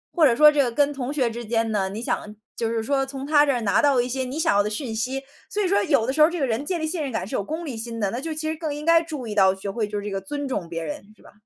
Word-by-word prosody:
或 335 -3 +5
者 235 - +3
说 300 +4 +8
这 295 -1 +3
个 245 - -1
跟 290 +4 +2
同 270 -1 -4
学 265 -5 +1
之 240 +1 -6
间 225 0 0
呢， 195 -3 0
你 205 +3 -6
想， 210 -3 -3 0.2
就 230 - -1
是 225 -1 -1
说 270 +3 +1
从 270 0 -6
他 295 0 +4
这 - - +4
儿 245 -3 -1
拿 205 -3 +2
到 280 -4 +4
一 245 - +1
些 260 +1 -2
你 260 +4 -5
想 320 - +2
要 205 - +5
的 205 - -1
讯 225 +1 -4
息。 260 +4 -2 0.3
所 420 - -1
以 - - +1
说 395 +2 +3
有 275 -8 +2
的 260 - -1
时 305 - +1
候 305 - +8
这 350 0 -4
个 275 - +2
人 235 +1 -1
建 345 +3 -2
立 315 - -1
信 320 +1 -2
任 280 -3 -3
感 220 -6 -2
是 - - -4
有 - - 0
功 320 - -5
利 275 -6 -5
心 230 0 -5
的， 200 -2 0
那 240 - -3
就 325 +2 -4
其 310 0 -3
实 - - -3
更 310 -2 -3
应 295 +1 -7
该 335 0 +6
注 305 -6 -6
意 215 - -4
到 190 -2 +4
学 195 +1 -5
会 215 0 -2
就 210 - -4
是 205 - -7
这 210 - -4
个 195 0 -3
尊 290 +2 -4
重 200 -10 -3
别 165 -1 -4
人， 155 +2 -5
是 - - -23
吧？ - - -16
260 Hz, 380 characters per minute, -24 LUFS, 220-295 Hz, 0.3 s, 说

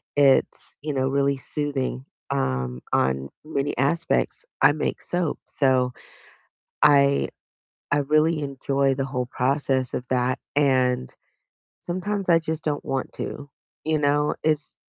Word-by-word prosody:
it's, 140 -2 +3
you 150 0 -3
know, 130 -1 +1
really 140 0 +1
soothing, 135 -2 -2 0.2
um, 65 -1 -1
on 65 +1 +1 0.2
many 145 -2 -2
aspects. 155 - 0 0.2
I - - +7
make - - -2
soap, 175 -4 -1
so 130 -2 +2 0.9
I 140 -1 +5 0.6
I 145 - +4
really 155 +3 +2
enjoy 140 0 0
the 135 0 -2
whole 125 -2 -2
process 130 0 0
of 125 - -3
that, 125 0 +1 0.2
and 130 - +2 0.7
sometimes 190 +2 -3
I 165 -1 +6
just 160 0 -4
don't 145 -2 -2
want 135 -1 -3
to, 145 0 -6 0.4
you 155 0 +2
know, 145 0 +2
it's 155 -1 0
140 Hz, 130 wpm, -24 LUFS, 130-150 Hz, 0.9 s, I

